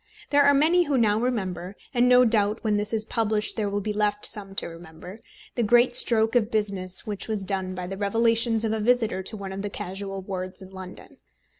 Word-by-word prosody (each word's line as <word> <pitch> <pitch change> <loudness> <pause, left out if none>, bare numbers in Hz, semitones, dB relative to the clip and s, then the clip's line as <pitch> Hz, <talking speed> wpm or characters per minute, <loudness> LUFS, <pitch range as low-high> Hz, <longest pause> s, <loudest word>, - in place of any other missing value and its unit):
There 285 0 +5
are 285 0 +5
many 335 +5 +3
who 285 -3 0
now 215 -3 +2
remember 190 -6 -3 0.2
and 245 0 +3
no 250 0 +6
doubt 215 -1 +1
when 215 -2 +1
this 210 0 -2
is 220 -1 -1
published 215 -2 -1
there 210 -3 -1
will 205 0 -2
be 210 +1 -3
left 210 0 0
some 195 -2 0
to - - -2
remember 170 +4 -11 0.3
the 240 - -2
great 240 +2 +3
stroke 225 -2 +4
of 230 -3 +2
business 195 -5 -2
which 205 -2 -5
was 215 -3 -3
done 190 -1 -2
by 180 -1 -5
the 195 +2 -6
revelations 225 +2 +1
of 220 - -1
a 220 - -2
visitor 225 -3 +1
to 210 +3 -5
one 195 -1 -7
of 195 +1 -5
the 205 - -4
casual 195 0 -6
wards 185 -1 -6
in 190 -1 -13
London. 185 -1 -11
210 Hz, 215 wpm, -25 LUFS, 195-230 Hz, 0.3 s, no